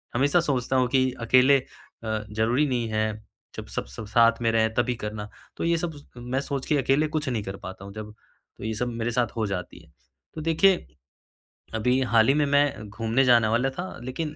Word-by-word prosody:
हमेशा 140 Hz, +7 st, +3 dB
सोचता 130 Hz, -5 st, -1 dB
हूँ 130 Hz, -1 st, +3 dB
कि 130 Hz, -1 st, +3 dB, 0.2 s
अकेले 130 Hz, +3 st, +6 dB
अ, 110 Hz, -3 st, -7 dB
ज़रूरी 115 Hz, +7 st, +2 dB
नहीं 120 Hz, -3 st, -1 dB
है, 110 Hz, 0 st, 0 dB, 0.4 s
जब -, -, -5 dB
सब -, -, -2 dB
सब 65 Hz, -, -9 dB
साथ 115 Hz, +1 st, +4 dB
में 115 Hz, -, +2 dB
रहें 110 Hz, 0 st, +2 dB
तभी 120 Hz, +1 st, 0 dB
करना। 105 Hz, 0 st, -5 dB, 0.3 s
तो -, -, -3 dB
ये 170 Hz, 0 st, +2 dB
सब 160 Hz, -3 st, -4 dB
स 145 Hz, -, -14 dB
मैं 125 Hz, +3 st, -2 dB
सोच 140 Hz, -1 st, -4 dB
के 150 Hz, -, +2 dB
अकेले 135 Hz, +3 st, +2 dB
कुछ 150 Hz, -3 st, -2 dB
नहीं 115 Hz, -5 st, -2 dB
कर 95 Hz, -1 st, -6 dB
पाता 95 Hz, +1 st, -8 dB
हूँ 100 Hz, -, -10 dB
जब, 105 Hz, 0 st, -8 dB, 0.4 s
तो -, -, -10 dB
ये 110 Hz, -, -2 dB
सब 125 Hz, +3 st, -2 dB
मेरे 115 Hz, 0 st, -2 dB
साथ 120 Hz, 0 st, +1 dB
हो 110 Hz, -, +1 dB
जाती 90 Hz, -3 st, -5 dB
है। -, -, -23 dB, 0.4 s
तो 155 Hz, -, -5 dB
देखिए, 175 Hz, +4 st, +3 dB, 0.9 s
अभी 125 Hz, +4 st, +2 dB
हाल 115 Hz, -2 st, +3 dB
ही 135 Hz, -, +5 dB
में 150 Hz, 0 st, +2 dB
मैं 140 Hz, -6 st, +1 dB
घूमने 115 Hz, +4 st, +1 dB
जाने 120 Hz, -3 st, +5 dB
वाला 120 Hz, +4 st, +1 dB
था, 175 Hz, +6 st, -6 dB
लेकिन 150 Hz, +4 st, -4 dB
125 Hz, 215 wpm, -25 LUFS, 110-140 Hz, 0.9 s, अकेले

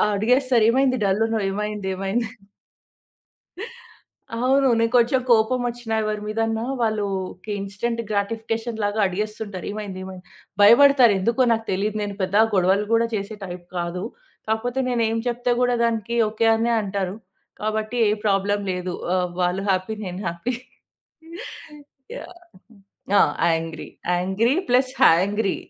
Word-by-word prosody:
అడిగేస్తారు, 245 Hz, +1 st, +3 dB
"ఏమైంది? 260 Hz, -1 st, +2 dB
డల్లున్నవు. 220 Hz, +2 st, +1 dB
ఏమైంది? 210 Hz, -1 st, -3 dB
ఏమైంది?" 205 Hz, +4 st, -1 dB, 2.1 s
అవును. 265 Hz, +3 st, +3 dB
నేను 230 Hz, 0 st, +1 dB
కొంచెం 245 Hz, +2 st, +3 dB
కోపమోచ్చినా 240 Hz, 0 st, +1 dB
ఎవరి 215 Hz, 0 st, -2 dB
మీదన్నా 225 Hz, +1 st, -1 dB, 0.2 s
వాళ్లు 215 Hz, -2 st, 0 dB, 0.3 s
ఒక 185 Hz, -, -18 dB
ఇన్‌స్టంట్ 220 Hz, +4 st, -3 dB
గ్రాటిఫికేషన్ 225 Hz, +2 st, -2 dB
లాగా 205 Hz, +1 st, -1 dB
అడిగేస్తుంటారు, 205 Hz, 0 st, -4 dB
"ఏమైంది? 205 Hz, -3 st, -6 dB
ఏమైంది?" 185 Hz, -1 st, -9 dB, 0.4 s
భయపడతారు. 245 Hz, +1 st, +7 dB
ఎందుకో 235 Hz, +6 st, +1 dB
నాకు 225 Hz, 0 st, -3 dB
తెలియదు. 205 Hz, +3 st, -1 dB
నేను 205 Hz, -1 st, -5 dB
పెద్దగా 200 Hz, +4 st, +3 dB
గొడవలు 190 Hz, +3 st, +3 dB
కూడా 230 Hz, 0 st, +4 dB
చేసే 200 Hz, +2 st, -4 dB
టైప్ 175 Hz, -1 st, -8 dB
కాదు. 175 Hz, +1 st, -3 dB, 0.4 s
కాకపోతే 235 Hz, +4 st, -1 dB
నేనేమి 225 Hz, -2 st, 0 dB
చెప్పినా 245 Hz, 0 st, 0 dB
కూడా 245 Hz, 0 st, +2 dB
దానికి 230 Hz, 0 st, -1 dB
ఓకే 220 Hz, +1 st, -1 dB
అనే 230 Hz, +1 st, 0 dB
అంటారు. 195 Hz, -1 st, -3 dB, 0.5 s
కాబట్టి 215 Hz, +2 st, -2 dB
ఏ -, -, +2 dB
ప్రాబ్లమ్ 205 Hz, 0 st, +1 dB
లేదు, 180 Hz, 0 st, -4 dB, 0.2 s
ఆహ్, 180 Hz, -1 st, 0 dB
వాళ్లు 180 Hz, +2 st, 0 dB
హ్యాపీ 185 Hz, +3 st, 0 dB
నేను 180 Hz, 0 st, -6 dB
happy. 170 Hz, +9 st, -3 dB, 1.6 s
Yeah! 205 Hz, -, -3 dB, 0.2 s
Angry 180 Hz, -, -1 dB
plus 255 Hz, +1 st, +3 dB
hangry 195 Hz, +4 st, +3 dB
215 Hz, 120 wpm, -23 LUFS, 195-235 Hz, 2.1 s, భయపడతారు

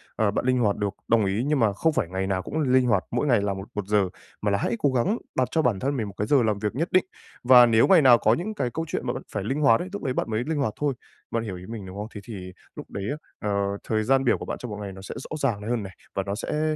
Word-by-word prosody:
Ờ, 105 Hz, -2 st, +2 dB
bạn 105 Hz, -, -2 dB
linh 130 Hz, 0 st, +3 dB
hoạt 105 Hz, -4 st, +2 dB
được, 105 Hz, -1 st, 0 dB, 0.2 s
đồng 110 Hz, -2 st, +3 dB
ý, 100 Hz, +4 st, 0 dB
nhưng 150 Hz, -1 st, +2 dB
mà 110 Hz, -4 st, +3 dB
không 160 Hz, +11 st, +1 dB
phải 95 Hz, -, 0 dB
ngày 95 Hz, +1 st, -2 dB
nào 95 Hz, -1 st, 0 dB
cũng 150 Hz, -, -4 dB
l 150 Hz, -, +1 dB
linh 130 Hz, -1 st, +5 dB
hoạt, 100 Hz, -6 st, +2 dB
mỗi 125 Hz, +5 st, 0 dB
ngày 120 Hz, -6 st, +4 dB
làm 100 Hz, -1 st, -1 dB
một 95 Hz, +1 st, -7 dB
một 105 Hz, -2 st, -2 dB
giờ, 105 Hz, -3 st, +2 dB, 0.3 s
mà 105 Hz, -, +1 dB
là 100 Hz, -, +2 dB
hãy 115 Hz, -, -1 dB
cố 145 Hz, -, +2 dB
gắng 130 Hz, -, +1 dB, 0.2 s
đặt 130 Hz, -, +2 dB
cho 160 Hz, -, +2 dB
bản 120 Hz, -9 st, +1 dB
thân 140 Hz, +4 st, -1 dB
mình 110 Hz, -4 st, -2 dB
một 100 Hz, -, -8 dB
cái 105 Hz, -, -1 dB
giờ 135 Hz, -1 st, +4 dB
làm 105 Hz, -2 st, 0 dB
việc 105 Hz, +2 st, -2 dB
nhất 165 Hz, +6 st, -1 dB
định, 185 Hz, -, +4 dB, 0.4 s
và 125 Hz, -1 st, +8 dB
nếu 115 Hz, -1 st, +4 dB
ngày 185 Hz, -4 st, +7 dB
nào 130 Hz, -4 st, +7 dB
có 110 Hz, 0 st, +3 dB
những 190 Hz, -, -2 dB
cái 125 Hz, -12 st, -1 dB
câu 160 Hz, -, -2 dB
chuyện -, -, -3 dB
mà -, -, 0 dB
bạn -, -, -6 dB
phải -, -, -3 dB
linh 135 Hz, +8 st, -2 dB
hoạt 115 Hz, -6 st, +5 dB
ấy, 180 Hz, -, -5 dB
lúc 205 Hz, -, -5 dB
ấy 130 Hz, -3 st, -1 dB
bạn -, -, -2 dB
mới 110 Hz, +2 st, 0 dB
linh 160 Hz, -1 st, -1 dB
hoạt 135 Hz, -7 st, 0 dB
thôi. 145 Hz, -2 st, +1 dB, 0.4 s
Bạn 115 Hz, -1 st, -1 dB
hiểu 100 Hz, -5 st, -5 dB
ý 90 Hz, -, -10 dB
mình, 110 Hz, -4 st, -6 dB
đúng 95 Hz, +1 st, -9 dB
không? 105 Hz, +1 st, -4 dB
Thế 100 Hz, -, -6 dB
thì 95 Hz, -4 st, -8 dB, 0.2 s
lúc -, -, -9 dB
đấy 100 Hz, -, -4 dB
á, 145 Hz, -, -3 dB, 0.3 s
ờ, 100 Hz, 0 st, 0 dB
thời 110 Hz, -1 st, 0 dB
gian 135 Hz, +3 st, +3 dB
biểu 125 Hz, -, +3 dB
của -, -, -7 dB
bạn -, -, -4 dB
trong 125 Hz, -, -7 dB
một 105 Hz, -, -5 dB
ngày 100 Hz, -1 st, -5 dB
nó 95 Hz, -, -10 dB
sẽ 95 Hz, -, -8 dB
rõ 155 Hz, -, -4 dB
ràng 125 Hz, -8 st, 0 dB
này 105 Hz, -, -5 dB
hơn 120 Hz, -3 st, 0 dB
này 95 Hz, -1 st, -8 dB, 0.2 s
và 95 Hz, -, 0 dB
nó 100 Hz, +1 st, -3 dB
sẽ, 155 Hz, +7 st, -1 dB
115 Hz, 330 wpm, -25 LUFS, 100-135 Hz, 0.4 s, và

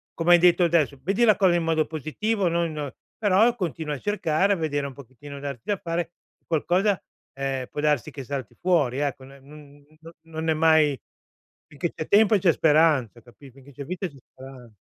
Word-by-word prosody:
come 170 Hz, +1 st, +1 dB
hai 175 Hz, -, +7 dB
detto 175 Hz, 0 st, +4 dB
adesso, 155 Hz, -5 st, +1 dB
vedi 200 Hz, +6 st, 0 dB
la 215 Hz, -3 st, +5 dB
cosa 185 Hz, -3 st, +3 dB
in 170 Hz, -, 0 dB
modo 160 Hz, -1 st, +1 dB
positivo, 180 Hz, +7 st, -2 dB
non 170 Hz, -1 st, -1 dB
non 145 Hz, -3 st, -5 dB, 0.3 s
però 220 Hz, +3 st, +3 dB
continua 160 Hz, -6 st, -4 dB
a -, -, -9 dB
cercare, 195 Hz, -2 st, 0 dB
a -, -, 0 dB
vedere 145 Hz, -3 st, -2 dB
un 135 Hz, -, -9 dB
pochettino, 140 Hz, +2 st, -11 dB
darti 140 Hz, -4 st, -6 dB
da 205 Hz, -2 st, -1 dB
fare, 170 Hz, 0 st, -3 dB, 0.4 s
qualcosa, 180 Hz, +5 st, +1 dB, 0.3 s
ehm, 135 Hz, -2 st, -3 dB
può -, -, -6 dB
darsi 150 Hz, -5 st, +1 dB
che 135 Hz, -, -8 dB
salti 135 Hz, -5 st, -5 dB
fuori, 155 Hz, -9 st, +1 dB
ecco, 140 Hz, -2 st, -3 dB
no 135 Hz, +1 st, -15 dB
n 145 Hz, 0 st, -16 dB, 0.4 s
non 160 Hz, 0 st, -5 dB
è -, -, +4 dB
mai 155 Hz, -3 st, +3 dB, 0.7 s
finché 165 Hz, +4 st, -4 dB
c'è 155 Hz, -, -6 dB
tempo 210 Hz, +1 st, +5 dB
c'è 180 Hz, -3 st, +3 dB
speranza, 150 Hz, -8 st, +2 dB
capit 125 Hz, +3 st, -17 dB
finché 135 Hz, +1 st, -17 dB
c'è 140 Hz, -, -8 dB
vita 185 Hz, +3 st, -4 dB
c'è 140 Hz, -4 st, -15 dB
speran 130 Hz, -3 st, -13 dB
155 Hz, 190 wpm, -24 LUFS, 140-175 Hz, 0.7 s, hai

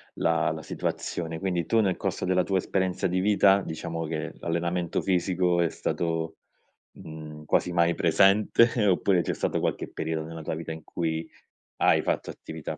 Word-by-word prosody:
la -, -, +1 dB
la -, -, -5 dB
situazione. 80 Hz, -1 st, -4 dB
Quindi 90 Hz, -3 st, -1 dB
tu 115 Hz, -, +2 dB
nel 95 Hz, -4 st, +2 dB
corso -, -, -2 dB
della 90 Hz, 0 st, +2 dB
tua 95 Hz, 0 st, 0 dB
esperienza 95 Hz, +1 st, 0 dB
di 90 Hz, +1 st, 0 dB
vita, 100 Hz, 0 st, +4 dB
diciamo 80 Hz, -1 st, -4 dB
che 80 Hz, 0 st, -4 dB
l'allenamento 85 Hz, 0 st, -1 dB
fisico 90 Hz, -1 st, +1 dB
è 85 Hz, -, +2 dB
stato, 80 Hz, +1 st, -2 dB, 0.6 s
mhmm, 75 Hz, -1 st, -10 dB
quasi 90 Hz, -, +1 dB
mai 85 Hz, 0 st, +3 dB
presente, 105 Hz, +6 st, +4 dB
oppure 95 Hz, -1 st, +3 dB
c'è -, -, -1 dB
stato -, -, -1 dB
qualche -, -, -1 dB
periodo 80 Hz, -1 st, -3 dB
nella 80 Hz, -1 st, -8 dB
tua 75 Hz, -, -3 dB
vita 80 Hz, 0 st, -6 dB
in 80 Hz, -1 st, -7 dB
cui 80 Hz, -1 st, -3 dB, 0.5 s
hai -, -, +4 dB
fatto -, -, -2 dB
attività 80 Hz, -2 st, -7 dB
85 Hz, 165 wpm, -27 LUFS, 80-95 Hz, 0.6 s, vita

